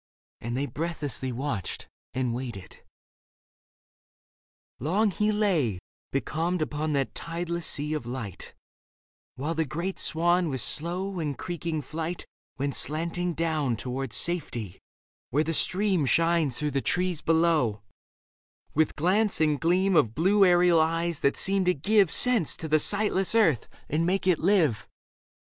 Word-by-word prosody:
And 120 +2 -4
they 140 - -1
Breathlessly 145 -3 -3
watched 120 -5 -4 0.3
and 125 -2 -1
waited; 120 -7 -7 2.0
long 195 - +1
he 210 +3 0
lay, 180 - +1 0.3
Becalmed 165 +6 -1
upon 155 0 -2
that 140 -2 -1
tideless 170 0 -3
sea 150 +1 +2
of 150 -6 -4
light, 115 -7 -7 0.8
While 145 +6 -3
the 160 0 0
great 170 +6 -4
swan 175 +1 +2
with 130 -2 -3
slow 180 - -2
and 145 -5 -3
creaking 165 -3 -4
flight 165 +5 -5 0.3
Went 140 0 -2
slanting 170 +5 0
down 155 -7 -1
towards 125 +2 -4
safety, 130 - -2 0.5
where 150 +4 +1
the 165 +1 -2
stream 185 -3 +2
Shines 165 -4 +2
through 150 -1 -2
the 135 - -1
trees 180 0 0
below, 160 -10 +1 0.9
with 160 0 +1
glance 195 +7 +1
and 150 -2 +1
gleam 185 +3 +2
Of 120 -9 +3
blue 195 +6 +3
aerial 175 -2 +5
eyes 165 0 0
that 140 - +1
seem 195 0 +3
to 180 0 +2
give 195 +5 +3
Sense 245 - +3
to 160 - -6
the 155 0 +3
sightless 205 +2 +2
earth 165 - +3 0.2
and 160 +3 0
make 190 +1 0
it 180 -4 +3
live. 165 - +2
160 Hz, 140 wpm, -27 LUFS, 140-180 Hz, 2.0 s, aerial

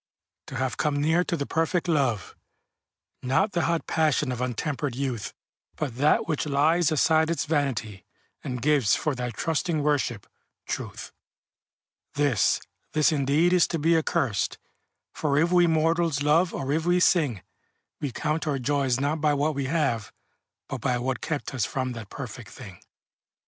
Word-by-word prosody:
To - - -8
have 130 -1 -2
come 150 -2 0
near 160 +4 +3
to 175 - -2
the 140 - -2
perfect 165 +3 0
love, 130 - 0 0.9
Not 135 +11 +1
the 170 -3 0
hot 170 -1 0
passion 150 -3 +1
of 125 -1 -4
untempered 130 +2 -2
youth, 125 -5 -3 0.4
But 135 -6 -4
that 145 +4 +3
which 155 -1 -1
lies 155 +4 +3
aside 160 +1 +3
its 165 -3 -1
vanity, 130 - -1 0.4
And 125 -2 -4
gives, 140 -7 +3
for 155 - -1
thy 125 -1 -3
trusting 155 - -1
worship, 140 -8 0 0.4
truth. - - -5 1.0
This, 145 -8 +2 0.3
this 155 0 +3
indeed 150 +4 +2
is 180 -2 +4
to 165 - -2
be 165 +2 +3
accursed, 155 - 0 0.6
For 140 -2 0
if 165 +3 +3
we 175 -1 +5
mortals 165 -2 +1
love, 165 +4 +3
or 135 0 -3
if 160 +2 +1
we 175 +1 +3
sing, 150 - +2 0.6
We 145 - -3
count 155 +5 -2
our 145 -2 0
joys 135 -1 0
not 145 +3 -1
by 150 -1 +3
what 150 +2 +1
we 140 -1 -2
have, 135 -7 0 0.6
But - - -5
by 125 - +1
what 130 +1 -2
kept 150 -4 -3
us 130 -5 -1
from 130 -1 -2
that 115 -4 -8
perfect - - -8
thing. - - -11
145 Hz, 160 wpm, -26 LUFS, 130-160 Hz, 1.0 s, we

